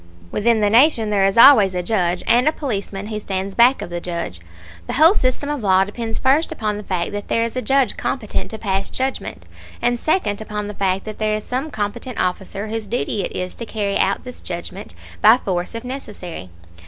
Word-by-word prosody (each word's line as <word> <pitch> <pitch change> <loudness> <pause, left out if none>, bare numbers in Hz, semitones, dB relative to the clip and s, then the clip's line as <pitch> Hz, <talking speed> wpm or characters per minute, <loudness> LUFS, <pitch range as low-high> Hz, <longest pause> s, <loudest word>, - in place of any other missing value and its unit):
Within 225 +1 +2
the 205 - +3
nation 230 -3 +4
there 200 -2 +3
is 195 +2 +1
always 215 -7 +8
a 180 - -1
judge, 180 -4 0
and 240 +4 +4
a - - +5
policeman 205 -9 -4
who 215 -1 -3
stands 195 -1 -3
back 245 +5 +4
of 175 - -8
the 175 0 -4
judge. 170 - -5 0.5
The - - -3
whole 320 +6 +6
system 260 -5 0
of 295 -3 -2
law 190 -2 +4
depends 225 +3 -5
first 275 +5 +2
upon 210 -1 -2
the 210 - -7
fact 180 -3 -2
that 205 0 -5
there 230 - +1
is 230 +1 -3
a 255 - -1
judge 270 -2 +1
competent 215 -6 -3
to 220 - -5
pass 195 -2 -1
judgment, 265 +1 -4 0.3
and 240 0 0
second 220 - 0
upon 210 -1 -4
the 210 - -6
fact 195 -1 -1
that 215 -1 -7
there 215 -1 +1
is 215 - -4
some 260 +5 -3
competent 220 +1 -4
officer 190 +3 -2
whose 220 -1 -4
duty 225 -2 -1
it - - -4
is 180 0 -3
to 230 - -5
carry 205 -3 -2
out 195 - +1
this 250 0 -9
judgment, 180 +3 -6 0.3
by 220 +3 +7
force 185 -2 -3
if 230 - -5
necessary. 210 - -7
210 Hz, 215 wpm, -20 LUFS, 195-245 Hz, 0.5 s, always